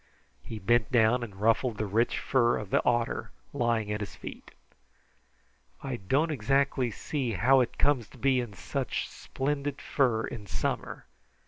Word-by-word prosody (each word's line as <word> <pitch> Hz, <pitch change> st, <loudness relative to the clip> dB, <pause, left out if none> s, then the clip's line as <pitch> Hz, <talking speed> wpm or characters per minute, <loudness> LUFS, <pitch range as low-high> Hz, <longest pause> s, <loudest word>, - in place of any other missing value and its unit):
He 115 Hz, -, -7 dB
bent 115 Hz, +3 st, +2 dB
down 120 Hz, 0 st, +4 dB
and 110 Hz, -5 st, -6 dB
ruffled 115 Hz, +1 st, +2 dB
the 110 Hz, -, -1 dB
rich 110 Hz, +4 st, +1 dB
fur 120 Hz, -3 st, +2 dB
of 105 Hz, -3 st, -7 dB
the -, -, +3 dB
otter 120 Hz, -1 st, 0 dB, 0.2 s
lying 115 Hz, -5 st, 0 dB
at 105 Hz, -, -1 dB
his 100 Hz, -2 st, -6 dB
feet. -, -, -9 dB, 1.3 s
"I 135 Hz, -3 st, -3 dB
don't 135 Hz, -, +1 dB
exactly 135 Hz, 0 st, +1 dB
see 125 Hz, +2 st, -3 dB
how 130 Hz, +8 st, +5 dB
it 125 Hz, -, 0 dB
comes 130 Hz, -7 st, +2 dB
to -, -, -17 dB
be 130 Hz, +1 st, +2 dB
in 120 Hz, -4 st, -4 dB
such 135 Hz, +2 st, -3 dB
splendid 140 Hz, 0 st, -3 dB
fur 120 Hz, -6 st, +1 dB
in 105 Hz, -2 st, -7 dB
summer. -, -, -3 dB
120 Hz, 155 wpm, -29 LUFS, 110-135 Hz, 1.3 s, how